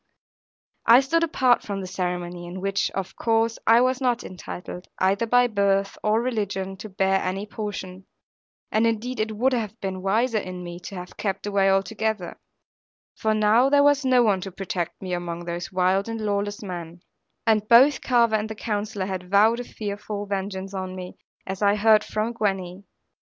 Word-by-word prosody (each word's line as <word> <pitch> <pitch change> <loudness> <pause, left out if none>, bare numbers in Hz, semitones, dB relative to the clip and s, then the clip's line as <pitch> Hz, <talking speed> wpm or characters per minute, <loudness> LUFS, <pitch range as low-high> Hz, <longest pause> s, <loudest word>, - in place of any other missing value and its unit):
I 235 +2 +9
stood 330 +5 +1
apart 260 -6 +3
from 200 -1 -4
the 190 - -5
ceremony, 180 -1 -4
in 180 +2 -7
which 195 +1 0
of 195 -1 -4
course 225 0 +1
I 230 +2 +7
was 255 +1 +1
not 245 -2 +1
entitled, 180 0 -8
either 195 +5 +1
by 245 +2 +5
birth 200 -3 +1
or 215 +1 +3
religion, 200 -5 -2
to 215 +2 -8
bear 190 0 +1
any 190 +2 -2
portion; 195 -3 -6 0.6
and 220 +1 +3
indeed 235 +3 -2
it 215 0 -2
would 260 +4 +2
have 220 -2 -3
been 190 -1 -4
wiser 220 +4 +1
in 185 -2 -7
me 175 0 -7
to 195 - -7
have 180 0 -9
kept 195 -1 -3
away 200 -1 +2
altogether; 195 0 -1 0.8
for 220 0 0
now 215 +5 +4
there 285 0 +5
was 290 -1 +4
no 255 -2 +4
one 200 -4 +2
to 195 - -6
protect 185 -2 -4
me 185 -1 -3
among 175 -1 -4
those 170 0 -5
wild 185 +3 +1
and 225 0 -4
lawless 205 0 -2
men; 175 -2 -7 0.4
and 215 -2 +2
both 265 +4 +6
Carver 235 -3 +3
and 215 0 -1
the 220 - -5
Counsellor 210 -2 -3
had 185 -2 -5
vowed 215 +4 +4
a - - -3
fearful 205 -2 -5
vengeance 195 -1 -4
on 185 -1 -4
me, 180 -1 -8 0.3
as 190 +1 -5
I 205 0 +4
heard 215 0 +5
from 215 +2 -2
Gwenny. 195 -3 -2
205 Hz, 180 wpm, -24 LUFS, 190-225 Hz, 0.8 s, I